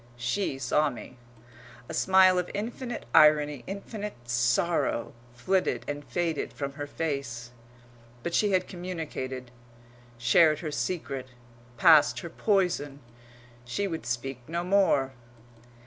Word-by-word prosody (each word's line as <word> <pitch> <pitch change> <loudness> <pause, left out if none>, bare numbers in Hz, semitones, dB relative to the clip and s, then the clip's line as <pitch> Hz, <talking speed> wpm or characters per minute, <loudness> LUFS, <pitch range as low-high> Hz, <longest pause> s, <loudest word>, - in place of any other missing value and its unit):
She 135 +5 -1
saw 145 +4 +1
me. 125 0 -10 0.7
A - - -7
smile 190 -1 +5
of 180 - -3
infinite 235 +3 -5
irony, 150 -3 +5
infinite 205 +1 -6
sorrow, 120 +3 +1 0.2
flitted 185 +10 0
and 145 0 -4
faded 165 -7 -2
from 140 +3 -4
her 145 0 -6
face. 140 -7 -4 0.7
But 170 - -3
she 210 - +3
had 185 -1 +1
communicated, 155 -8 -6 0.7
shared 150 +7 +4
her 155 -3 -4
secret, 135 -1 -3 0.5
passed 155 +4 +6
her 170 - -7
poison; 175 -10 0 0.6
she 125 +12 -2
would 165 -9 -5
speak 125 +1 -3
no 170 +2 -2
more. 180 -8 +2
150 Hz, 115 wpm, -28 LUFS, 130-185 Hz, 0.7 s, passed